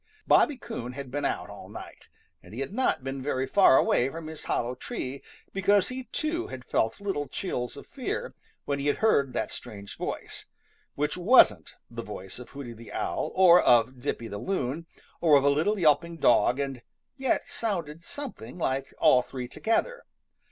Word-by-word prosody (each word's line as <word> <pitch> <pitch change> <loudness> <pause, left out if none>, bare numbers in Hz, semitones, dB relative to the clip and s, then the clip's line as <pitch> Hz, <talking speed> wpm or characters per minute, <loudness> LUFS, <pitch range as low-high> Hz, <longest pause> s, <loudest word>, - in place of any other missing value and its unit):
Bobby 290 - +4
Coon 125 - -6
bad 135 -1 -7
been 145 +1 -2
out - - -2
all - - -11
night, - - -11 0.3
but - - -15
he 125 - -5
had 135 - -4
not 215 - +1
been 135 0 -4
very 130 -1 -1
far 135 -1 +6
away 125 - +3
from 165 +3 -7
his 155 -1 -7
hollow 120 +1 -1
tree, 135 - -6 0.3
because 195 +1 +3
he 255 0 -6
too 315 +8 -2
had 130 -1 -8
felt 110 - 0
little 195 -8 -2
chills 125 -10 -4
of - - -10
fear - - -4 0.3
when 140 -1 -1
he 140 - -2
heard 145 -5 +2
that - - -2
strange 100 -1 -9
voice, - - -6 0.5
which 150 +3 -1
wasn't 175 - +5 0.2
the 115 0 -5
voice 100 -1 -8
of 125 - -10
Hooty 135 -4 -8
the 115 0 -12
Owl - - -2
or 180 -2 +7
of 120 +2 +4
Dippy 120 -4 -3
the 100 -1 -6
Loon 165 - -2 0.3
or 155 -4 +6
of 135 - +2
a 140 - +5
little 165 +9 +1
yelping 170 0 +2
dog 125 -2 +4
and 135 -3 -3 0.3
yet 265 -2 0
sounded 170 -8 -3
something 180 - -7
like 135 -4 -2
all 125 - +5
three 125 0 -6
together. 485 - -1
140 Hz, 180 wpm, -27 LUFS, 125-190 Hz, 0.5 s, or